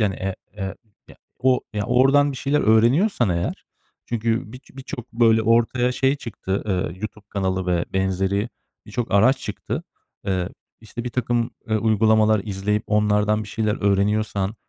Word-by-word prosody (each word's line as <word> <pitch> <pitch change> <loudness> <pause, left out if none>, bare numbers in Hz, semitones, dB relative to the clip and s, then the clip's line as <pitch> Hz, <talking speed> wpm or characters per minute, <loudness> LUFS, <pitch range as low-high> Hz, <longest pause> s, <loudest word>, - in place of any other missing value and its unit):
Yani, 100 -3 +1
e 95 0 -3 0.2
e 100 - -3 0.4
ya, - - -15 0.2
o 130 0 +3
ya, 105 -1 -2
oradan 135 +3 +4
bir - - -7
şeyler 140 +3 +1
öğreniyorsan 120 - +3
eğer. 85 0 -2 0.4
Çünkü 115 -1 -1
bi 125 - -8
birçok 130 -2 -8
böyle 115 -1 +4
ortaya 120 +2 +2
şey 135 +2 +1
çıktı, 100 -6 -4
ııı, 90 -4 -1
YouTube 105 -1 -7
kanalı 95 -2 -1
ve 85 -1 +1
benzeri 95 +3 0 0.4
birçok 115 +2 -3
araç 125 +7 +5
çıktı. - - -5 0.4
Eee, 95 -2 0 0.3
işte 115 +2 -7
birtakım 120 -1 -1 0.3
uygulamalar 110 -1 +3
izleyip 105 +1 -1
onlardan 105 0 +2
bir 105 - -9
şeyler 110 -1 -1
öğreniyorsan 100 0 +1
110 Hz, 145 wpm, -22 LUFS, 100-120 Hz, 0.4 s, araç